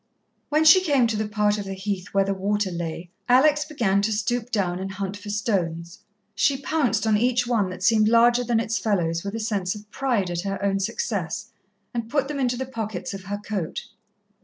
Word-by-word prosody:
When 305 +1 +2
she 315 +4 +8
came 280 -8 +3
to 225 -1 0
the 215 0 -1
part 210 -1 +1
of 200 - -5
the 195 0 -5
Heath 190 -1 -3
where 195 0 +2
the 195 0 -1
water 200 0 -1
lay, 170 0 -5 0.2
Alex 295 +4 +5
began 220 -11 +1
to 215 +2 0
stoop 225 +3 -1
down 185 -6 -1
and 195 0 -5
hunt 195 0 -4
for 205 +1 -9
stones. 175 -5 -2 0.3
She 270 +7 +2
pounced 255 -7 0
on 215 -1 +3
each 245 +1 +2
one 225 -6 +1
that 185 0 -7
seemed 215 0 +4
larger 235 +1 +5
than 235 -1 +1
its 225 0 -1
fellows 170 -6 0
with 200 +2 -4
a - - -3
sense 205 -4 -1
of 210 0 -12
pride 235 -9 0
at 170 0 -2
her 195 +1 -3
own 195 0 +1
success, 230 - -3 0.4
and 230 -2 -3
put 275 +1 0
them 295 -2 -3
into 250 -2 0
the 260 - -3
pockets 220 -7 -5
of 195 -1 -8
her 205 +1 -3
coat. 205 -5 -5
210 Hz, 210 wpm, -24 LUFS, 195-240 Hz, 0.4 s, she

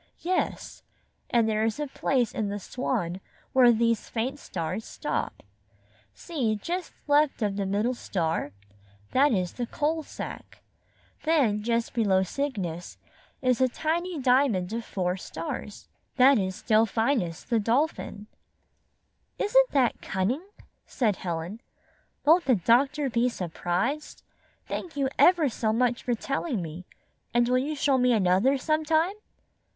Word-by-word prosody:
"Yes, 365 +1 -2 0.5
and 235 -2 +3
there 215 0 +1
is 225 +4 -1
a 295 - -1
place 265 -3 0
in 210 -2 -2
the 205 - -3
Swan 195 -5 -3 0.3
where 250 -2 +7
these 230 -1 +1
faint 250 +5 -2
stars 180 - -4
stop. - - -4 0.7
See, 255 -10 -1
just 345 - -4 0.2
left 290 -4 +3
of 205 - +1
the 200 - -2
42 190 - -3
middle 215 +5 +1
star? 165 - -2 0.6
That 285 +3 +4
is 185 -5 0
the 240 -1 -4
Coal 310 +5 -1
Sack. - - -9 0.6
Then 275 -10 +2
just 230 +1 -1
below 200 -5 +3
Cygnus 190 - -4 0.5
is 255 -1 +2
a 260 - +5
tiny 330 +5 -2
diamond 250 -8 +2
of 230 0 -3
four 180 -3 -2
stars. 165 +4 -6 0.3
That 265 -1 +6
is 185 -1 -3
Delphinus, 220 - +1
the 235 -2 +1
Dolphin." 230 -2 -1 1.1
"Isn't - - +4
that 260 -4 +1
cunning?" 235 - -2 0.4
said 220 -8 0
Helen. 175 +5 -4 0.6
"Won't 335 +4 +5
the 255 - +4
doctor 270 - +2
be 240 0 +1
surprised? 180 - -3 0.4
Thank 330 -5 -5
you 275 -2 +1
ever 350 -4 +6
so 225 -3 -1
much 240 +1 +1
for 245 - 0
telling 275 - -2
me, 170 +1 -7 0.5
and 240 0 +4
will 250 +1 +3
you 295 +4 -2
show 275 -2 +2
me 250 0 +4
another 200 +6 +3
sometime?" 315 +5 +1
240 Hz, 135 wpm, -27 LUFS, 205-285 Hz, 1.1 s, where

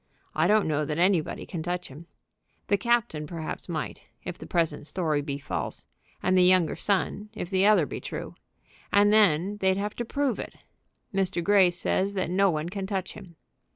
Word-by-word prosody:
I - - +2
don't 210 -2 +3
know 150 -1 +1
that 150 0 -3
anybody 180 -2 +1
can 170 - -5
touch 180 +2 -3
him. 150 +5 -12 0.6
The 200 - +4
captain 230 -11 0
perhaps 165 +2 -6
might, 160 -3 -4 0.2
if 180 - -5
the - - -10
present 160 -4 -1
story 155 -6 0
be 140 -1 -4
false; 140 - -4 0.4
and 185 - +2
the 185 - +5
younger 180 -3 +4
son, 205 +1 -1
if 185 -3 -5
the 190 +1 +4
other 205 -7 +5
be - - -6
true. - - -6 0.6
And 205 +1 +5
then 200 -1 +3
they'd 190 -1 +2
have 205 +1 -3
to 240 - -1
prove 270 0 -1
it. - - -7 0.6
Mr. 190 -2 0
Grey 195 -1 +5
says 190 +3 -1
that 185 -3 -1
no 195 +2 +4
one 155 0 -2
can 195 0 -4
touch 190 -2 -3
him." 185 -5 -12
185 Hz, 190 wpm, -27 LUFS, 165-200 Hz, 0.6 s, the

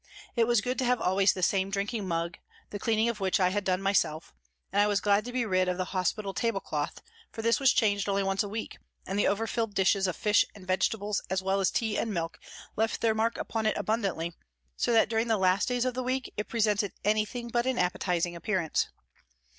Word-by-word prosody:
It 230 -2 +3
was 240 -3 +3
good 250 +2 -2
to 260 - +1
have 250 0 +2
always 190 +2 +3
the 185 - -5
same 190 +1 +2
drinking 200 +1 -2
mug, 170 0 -2 0.3
the 205 - -5
cleaning 225 +2 +1
of 235 -2 -2
which 190 -1 +1
I 180 -1 +4
had 205 +2 -1
done 185 0 0
myself, 180 -5 0 0.4
and 200 - +4
I 205 - +4
was 205 -1 +2
glad 205 +1 +2
to 245 - -5
be 250 -1 0
rid 185 -3 +2
of 180 - -1
the 185 - -1
hospital 195 +2 -1
tablecloth, 195 -11 -2 0.3
for 225 - -6
this 230 +1 +3
was 270 -3 +5
changed 205 -2 +1
only 200 0 +1
once 195 0 +1
a 205 - -3
week, 220 +2 -5 0.3
and 195 +2 -2
the - - +3
over 205 +3 +1
filled 225 -2 -2
dishes 195 0 +3
of 180 - -2
fish 210 -1 +3
and 195 -3 -12
vegetables, 200 +2 0
as 190 0 -1
well 195 +1 +1
as 190 - +3
tea 220 -3 -1
and 225 - -1
milk, 165 -3 -3 0.4
left 225 +1 0
their 225 -1 +3
mark 225 +1 0
upon 220 -1 -2
it - - +1
abundantly, 195 -7 -1 0.4
so 240 - 0
that 225 -1 +5
during 225 +1 0
the 225 -1 +2
last 190 +1 +2
days 245 0 0
of 255 - 0
the 255 - -2
week 255 +1 -2
it 210 - -4
presented 210 -3 +1
anything 215 +3 0
but 240 +1 0
an 260 -1 0
appetising 175 -2 0
appearance. 170 -2 0
205 Hz, 225 wpm, -29 LUFS, 190-225 Hz, 0.4 s, was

